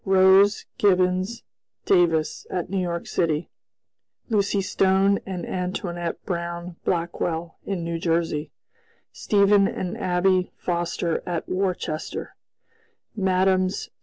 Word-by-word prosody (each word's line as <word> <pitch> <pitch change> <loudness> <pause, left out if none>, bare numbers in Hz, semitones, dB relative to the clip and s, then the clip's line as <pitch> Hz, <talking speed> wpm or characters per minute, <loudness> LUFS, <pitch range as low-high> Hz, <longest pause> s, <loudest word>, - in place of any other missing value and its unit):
Rose, 190 +1 +5
Gibbons, 185 +2 +2 0.4
Davis, 165 -4 +2
at 180 0 -3
New 195 - 0
York 170 -2 -2
city; 160 -1 -1 0.8
Lucy 200 -2 +1
Stone 195 +1 +2
and 185 -2 -4
Antoinette 175 -2 -4
Brown 170 -1 -4
Blackwell 170 -1 -2
in 190 -4 -2
New 165 0 -3
Jersey; 165 -3 0 0.6
Stephen 200 -1 +3
and 180 -2 -4
Abby 180 0 +1
Foster 170 -1 -1
at 175 -2 -3
Worcester; 185 -4 -3 0.8
Mmes. 185 -1 +1
180 Hz, 100 wpm, -24 LUFS, 170-190 Hz, 0.8 s, Rose